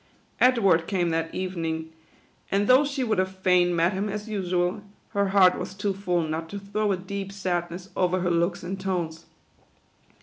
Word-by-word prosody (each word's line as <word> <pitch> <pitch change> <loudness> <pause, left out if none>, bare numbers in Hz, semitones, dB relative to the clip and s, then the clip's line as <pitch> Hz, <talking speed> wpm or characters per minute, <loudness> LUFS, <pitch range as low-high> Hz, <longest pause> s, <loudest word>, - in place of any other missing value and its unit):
Edward 200 -10 +4
came 180 -4 0
that 165 0 -1
evening, 165 -3 -3 0.6
and 200 +1 +1
though 255 +5 +6
she 280 -2 -2
would 220 -5 +1
have 190 0 -1
fain 180 -2 +3
met 170 +3 +2
him 200 +2 -2
as 210 +2 -5
usual, 185 -1 -1 0.3
her 200 -2 +1
heart 190 -2 +5
was 190 - -6
too 200 0 -1
full 180 -3 0
not 160 +1 -4
to 200 - -6
throw 205 +1 -1
a 190 - +1
deep 195 +1 -5
sad 180 -3 -2
ness 180 +2 -8
over 185 0 +1
her 180 -1 +1
looks 170 +2 0
and 190 +2 -4
tones. 170 -4 -3
185 Hz, 180 wpm, -26 LUFS, 175-200 Hz, 0.6 s, though